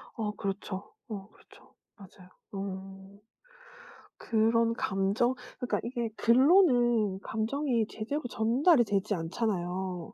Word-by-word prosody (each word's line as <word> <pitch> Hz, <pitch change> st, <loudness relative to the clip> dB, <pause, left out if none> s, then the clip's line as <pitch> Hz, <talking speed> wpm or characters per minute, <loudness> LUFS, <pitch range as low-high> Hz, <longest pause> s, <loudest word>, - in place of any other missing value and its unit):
어. 215 Hz, -3 st, -2 dB
그렇죠. 195 Hz, 0 st, -5 dB
어 205 Hz, -2 st, -7 dB
그렇죠. -, -, -21 dB, 0.2 s
맞아요. 185 Hz, -2 st, -15 dB, 0.2 s
음. 195 Hz, 0 st, -7 dB, 1.0 s
그런 230 Hz, +1 st, +2 dB
감정 195 Hz, +6 st, +1 dB, 0.3 s
그니까 250 Hz, -, -1 dB
이게 235 Hz, -1 st, -3 dB
글로는 240 Hz, -, +4 dB
감정이 230 Hz, 0 st, -1 dB
제대로 280 Hz, +8 st, -4 dB
전달이 245 Hz, -, +3 dB
되지 205 Hz, -1 st, 0 dB
않잖아요. 180 Hz, -1 st, -3 dB
215 Hz, 230 characters per minute, -29 LUFS, 195-240 Hz, 1.0 s, 글로는